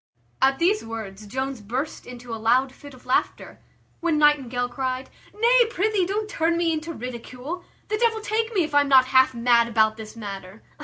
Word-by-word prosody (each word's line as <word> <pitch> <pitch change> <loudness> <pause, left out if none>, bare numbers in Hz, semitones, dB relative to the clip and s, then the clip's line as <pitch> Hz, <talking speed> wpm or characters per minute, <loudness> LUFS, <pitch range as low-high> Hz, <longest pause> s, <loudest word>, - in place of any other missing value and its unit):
At 270 0 +4
these 380 +5 +2
words 215 -3 -7
Jones 265 +2 -4
burst 255 +9 -4
into 245 -1 -9
a 225 - -6
loud 255 +4 +3
fit 285 0 -13
of 250 - -19
laughter; 255 - -1 0.4
when 335 -2 0
Nightingale 265 -5 +2
cried 255 +1 -4 0.2
"Nay, 475 +2 +4
prithee, 420 -4 0
don't 420 +2 -2
turn 335 -4 0
me 335 -1 +1
into 315 +1 -4
ridicule. 250 +5 -7 0.2
The 425 0 -2
devil 460 -2 +2
take 440 +1 -1
me 385 -6 +2
if 305 - -5
I 290 - +6
am 285 - -1
not 260 -2 +7
half 260 -1 +5
mad 235 0 +3
about 220 -1 +2
this 220 0 -9
matter! 200 -2 -8
265 Hz, 190 wpm, -24 LUFS, 235-340 Hz, 0.4 s, not